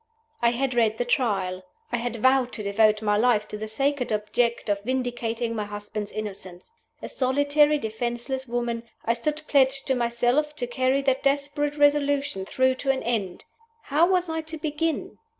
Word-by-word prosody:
I 235 - +5
had 255 +2 -1
read 225 -2 +2
the 245 - -1
Trial. 195 -7 0 0.3
I 240 - +1
had 240 0 -3
vowed 260 +2 +3
to 215 - -5
devote 215 +1 +3
my 210 -1 +2
life 215 -2 +3
to - - -5
the 215 +1 -5
sacred 270 +3 0
object 225 +3 0
of 200 -1 0
vindicating 240 -2 -2
my 210 -1 -2
husband's 205 0 -6
innocence. 195 - -6 0.3
A - - -3
solitary, 285 +3 +2
defenseless 240 +2 -3
woman, 235 -1 -2 0.2
I 230 - +3
stood 300 +6 -3
pledged 270 -1 +3
to 265 - +2
myself 245 +5 +1
to 250 - -2
carry 260 +3 +1
that 265 -1 +1
desperate 285 +1 0
resolution 285 -8 +2
through 260 +3 +2
to 275 - -2
an 270 -1 +1
end. 215 -6 -2 0.4
How 310 +5 +3
was 365 -1 +2
I 320 0 -2
to 320 0 -7
begin? 310 +1 -2
245 Hz, 170 wpm, -25 LUFS, 220-280 Hz, 0.4 s, I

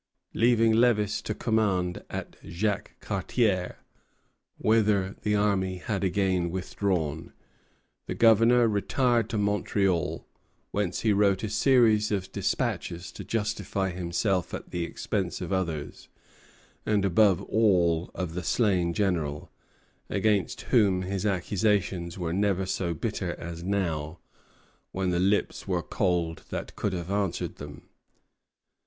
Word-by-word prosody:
Leaving 115 -1 +4
Lévis 110 -3 +2
to 110 - -4
command 100 -6 0
at - - -6
Jacques 100 +3 -3
Cartier, 100 -1 0 0.8
whither 105 -3 +2
the 105 0 +1
army 95 -3 +1
had 100 +2 -3
again 95 -2 +1
withdrawn, 90 -4 -2 0.7
the - - -3
Governor 115 +1 +5
retired 115 +2 +1
to 110 - -2
Montreal, 100 -3 0 0.5
whence 100 -4 -1
he 110 -2 +3
wrote 100 -1 +2
a 110 - -1
series 110 -2 +4
of 95 -2 -2
despatches 85 +1 -2
to - - -8
justify 105 -3 -2
himself 90 +1 -1
at - - -9
the 90 -1 -2
expense - - -3
of - - -4
others, 85 -6 -3 0.7
and 105 -2 +1
above 100 -1 +4
all 90 -6 +2
of 90 -3 -3
the 90 - -3
slain 90 -4 +1
general, 80 -8 -1 0.6
against 105 -3 0
whom 100 -7 +2
his 95 +2 -2
accusations 95 -2 0
were 85 -2 -2
never 95 -1 +1
so 90 -2 -2
bitter - - -3
as 85 0 -7
now, 85 -5 -2 0.7
when 95 -1 -1
the 85 - +1
lips 100 +3 0
were 90 -3 0
cold 85 -4 -1
that - - -5
could 105 - -2
have 90 +1 -4
answered 100 -3 -2
them. 70 -1 -10
95 Hz, 125 wpm, -27 LUFS, 90-105 Hz, 0.8 s, Governor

